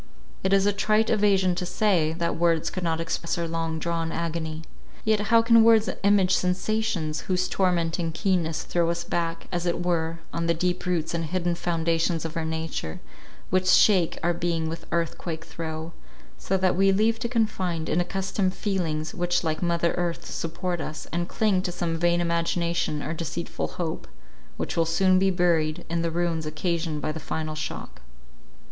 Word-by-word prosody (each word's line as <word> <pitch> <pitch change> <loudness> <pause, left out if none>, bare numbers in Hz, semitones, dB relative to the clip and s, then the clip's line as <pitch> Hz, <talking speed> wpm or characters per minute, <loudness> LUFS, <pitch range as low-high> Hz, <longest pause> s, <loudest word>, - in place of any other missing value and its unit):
It 190 - +1
is 195 0 +4
a 205 - +3
trite 215 +2 +2
evasion 200 -4 +3
to 180 - -3
say, 180 -4 +2
that 170 0 -1
words 165 -1 +2
could 185 - -4
not 165 -2 0
express 165 0 -2
our 170 -1 -1
long 165 -1 -2
drawn 165 0 -2
agony; 160 -1 -3 0.4
yet 220 -1 +3
how 230 +1 +5
can 230 -1 +6
words 225 -1 +5
image 200 -2 +4
sensations, 180 -4 0
whose 185 0 +1
tormenting 170 -3 0
keenness 165 -2 0
throw 170 -1 +1
us 170 0 -1
back, 170 -1 -2
as 175 -1 -1
it 175 0 -1
were, 165 -2 0 0.2
on 170 0 -1
the 170 - +2
deep 180 +2 -1
roots 170 -3 0
and 165 -1 -1
hidden 175 +1 0
foundations 165 -1 0
of 160 - -5
our 165 -1 -1
nature, 160 - -4 0.5
which 185 0 +2
shake 185 -2 +5
our 175 +1 +2
being 170 -1 -1
with 165 +1 -6
earth 170 -1 -1
quake 165 -1 -5
throe, 160 0 -6 0.4
so 190 - -1
that 185 -1 +2
we 195 +1 +4
leave 220 +3 +2
to 235 - -2
confide 190 -8 0
in 175 - +2
accustomed 190 +1 -1
feelings 165 -6 -2
which 175 0 0
like 155 -1 -1
mother 170 -1 +1
earth 170 -1 -2
support 175 +1 -3
us, 155 - -6
and 175 +1 -1
cling 205 -4 +2
to 185 -1 -3
some 170 -1 -2
vain 170 +1 +2
imagination 170 -2 0
or 155 - -3
deceitful 165 +1 -3
hope, 165 -3 -3 0.5
which - - -3
will 165 - +3
soon 185 +3 +3
be 195 0 +3
buried 170 -4 +1
in 170 0 +1
the 170 - 0
ruins 165 -1 -1
occasioned 160 -1 -2
by - - 0
the 160 - -5
final 155 0 -3
shock. 155 - -6
170 Hz, 180 wpm, -26 LUFS, 165-185 Hz, 0.5 s, can